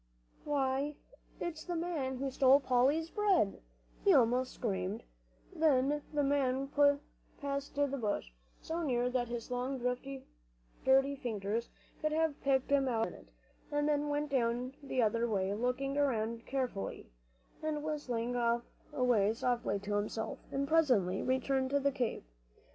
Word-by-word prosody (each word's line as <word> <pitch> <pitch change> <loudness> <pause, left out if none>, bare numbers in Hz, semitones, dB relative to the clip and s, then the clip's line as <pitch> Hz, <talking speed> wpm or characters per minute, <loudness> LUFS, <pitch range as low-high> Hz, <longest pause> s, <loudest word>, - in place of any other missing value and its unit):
"Why, 280 0 0 0.4
it's 325 -2 -4
the 350 - -3
man 320 -6 -2
who 270 +1 -2
stole 265 +1 +6
Polly's 275 +5 +2
bread!" 390 - +2 0.4
he 395 -4 +6
almost 250 0 +3
screamed. 195 0 -3 0.5
The 295 -2 +3
man 275 -2 +1
went 285 0 +5 0.4
past 280 0 -3
the 285 0 +3
bush, 220 - -2 0.3
so 330 +2 -3
near 250 -5 +1
that 250 -1 0
his 240 +1 -5
long 250 +2 -1
dirty 250 - -1
fingers 225 -3 -2 0.3
could 305 0 0
have 320 -2 0
picked 270 -1 +1
him 275 -1 +4
out 225 -3 +1
in - - -11
a - - -11
minute, - - -19 0.4
and 290 0 +1
then 295 0 +1
went 290 0 -1
down 245 0 0
the 260 -3 0
other 230 +2 +1
way, 195 -2 0
looking 250 +5 -1
around 230 -4 0
carefully, 255 - -3 0.5
and 310 -1 -2
whistling 245 -6 -2 0.6
away 240 -7 +2
softly 235 -4 0
to 205 +1 -3
himself, 210 +2 -2
and 275 +1 -1
presently 250 - +3
returned 260 0 +1
to 285 +1 +2
the 280 0 +2
cave. 255 -4 -2
265 Hz, 140 wpm, -33 LUFS, 235-285 Hz, 0.6 s, stole